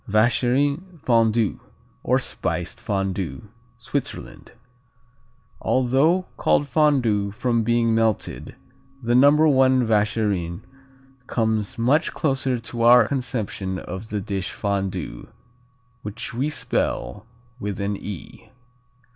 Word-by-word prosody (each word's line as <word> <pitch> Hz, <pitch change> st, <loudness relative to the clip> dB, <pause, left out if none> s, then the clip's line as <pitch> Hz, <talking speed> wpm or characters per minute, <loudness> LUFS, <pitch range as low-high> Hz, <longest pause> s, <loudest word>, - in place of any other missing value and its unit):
Vacherin 140 Hz, -, +1 dB
Fondu, 115 Hz, -3 st, +2 dB, 0.4 s
or -, -, +2 dB
Spiced -, -, -3 dB
Fondu. 95 Hz, -8 st, -3 dB, 0.3 s
Switzerland. -, -, -5 dB, 1.1 s
Although 135 Hz, +8 st, +2 dB
called 145 Hz, -, +2 dB
Fondu 125 Hz, -9 st, +2 dB
from 120 Hz, +1 st, 0 dB
being 115 Hz, 0 st, +2 dB
melted, 110 Hz, -2 st, -1 dB, 0.5 s
the 120 Hz, +1 st, +1 dB
No. 130 Hz, +3 st, +7 dB, 0.3 s
I 130 Hz, -, +5 dB
Vacherin 105 Hz, -6 st, 0 dB, 0.7 s
comes 110 Hz, -1 st, -1 dB
much 130 Hz, +7 st, +2 dB
closer 135 Hz, -4 st, 0 dB
to 115 Hz, +1 st, -6 dB
our 120 Hz, -1 st, +7 dB
conception 110 Hz, -8 st, -3 dB
of 95 Hz, +4 st, -7 dB
the 105 Hz, -, -2 dB
dish 95 Hz, -1 st, -3 dB
Fondue, 95 Hz, -9 st, -3 dB, 0.7 s
which 105 Hz, +3 st, -6 dB
we 130 Hz, +5 st, -1 dB
spell 105 Hz, -7 st, -2 dB, 0.3 s
with 100 Hz, -1 st, -4 dB
an 100 Hz, +1 st, -1 dB
"e." 100 Hz, -2 st, -9 dB
115 Hz, 100 wpm, -23 LUFS, 100-125 Hz, 1.1 s, No